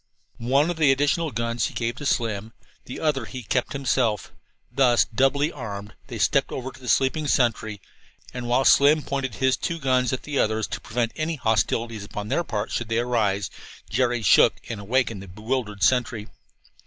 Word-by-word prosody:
One 135 +8 +2
of 175 - -5
the 150 -4 +5
additional 145 +4 +1
guns 115 -1 -1
he - - -11
gave 115 0 -1
to 145 - -3
Slim; 110 -3 -1 0.3
the 125 - -7
other 145 -6 0
he 130 +1 -8
kept 125 +4 -1
himself. 125 -5 0 0.4
Thus 125 -3 +4
doubly 140 +6 +1
armed, 105 - -7
they - - -6
stepped - - +2
over 130 0 -5
to - - -16
the 125 - -7
sleeping 145 +3 +2
sentry, 110 -5 +1 0.5
and 125 -1 -5
while 125 +2 +2
Slim 145 +2 +5
pointed 135 -4 -3
his 130 -1 +2
two 170 - -3
guns 130 -4 +1
at 130 - -3
the 145 -2 -2
others, 110 0 +1
to - - -5
prevent 115 0 -2
any 160 +1 -2
hostilities 115 -2 0
upon 105 +1 -6
their 155 +7 +1
part, 110 -6 -3
should 120 -2 -3
they 115 - 0
rouse, 110 -5 0 0.4
Jerry 120 -3 +1
shook - - +6
and 110 -3 -5
awakened 115 -1 0
the 95 - -10
bewildered 105 +1 -3
sentry. 120 -4 +1
120 Hz, 180 wpm, -24 LUFS, 110-135 Hz, 0.5 s, shook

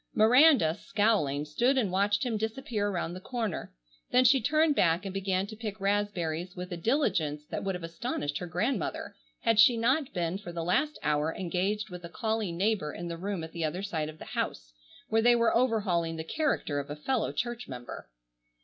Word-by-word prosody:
Miranda, 235 - +6
scowling, 195 -10 +1
stood 240 - +1
and 215 -8 +1
watched 205 +6 +1
him 235 -3 -1
disappear 220 -1 -2
around 175 -3 -2
the 180 - -6
corner, 225 - -4 0.4
then 250 +1 +4
she 265 +1 +5
turned 310 +4 +3
back 170 -1 +2
and 195 - -4
began 195 -1 0
to 220 - -9
pick 215 -1 -6
raspberries 190 -4 -1
with 180 0 -6
a - - -2
diligence 165 - 0
that - - -3
would 195 -1 -1
have 180 - -7
astonished 165 - -3
her 180 - -5
grandmother 195 - -2 0.3
had 225 -2 +3
she 230 +2 +7
not 260 +5 +1
been 175 +1 -2
for 175 -4 -8
the 170 -1 -4
last 270 - +1
hour 150 +1 +1
engaged 190 +4 -2
with 180 0 -8
a 170 - -7
calling 220 -2 -2
neighbor 195 -6 0
in 170 +2 -6
the 170 - -4
room 190 -1 -3
at 160 - -7
the 170 -1 -4
other 175 +5 -2
side 160 -6 -2
of 155 - -10
the - - -10
house, - - -4 0.4
where 225 0 +3
they 240 +1 +5
were 230 -1 +3
overhauling 200 -9 +1
the 160 - -4
character 165 - -1
of 140 - -6
a 145 - -4
fellow 225 - -1
church 240 0 -3
member. 120 - -8
195 Hz, 200 wpm, -29 LUFS, 165-230 Hz, 0.4 s, she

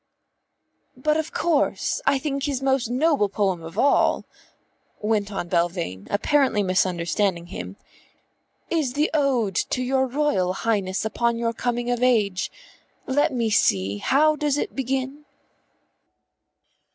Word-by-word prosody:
"But 300 +4 +1
of 315 -1 -3
course 330 - 0
I 275 - +4
think 275 0 -2
his 280 -3 -1
most 265 -3 +1
noble 265 -4 +2
poem 190 -3 0
of 165 0 -10
all," 285 - +3 0.7
went 210 -1 0
on 195 -3 -4
Belvane, 170 - -1
apparently 230 0 +2
misunderstanding 185 -1 0
him, 90 - -7 1.0
"is 305 -7 0
the 295 +3 +1
ode 260 -9 +1 0.2
to 255 - -1
your 265 +1 +1
Royal 245 -10 0
Highness 195 -2 -1
upon 235 +2 0
your 230 0 -1
coming 240 +1 -2
of 245 0 -1
age. 210 -7 +2 0.6
Let 290 +3 +1
me 235 -4 -1
see, 100 - +2
how 305 - +3
does 295 -1 0
it - - -3
begin? 270 +2 -3
235 Hz, 125 wpm, -24 LUFS, 190-275 Hz, 1.0 s, I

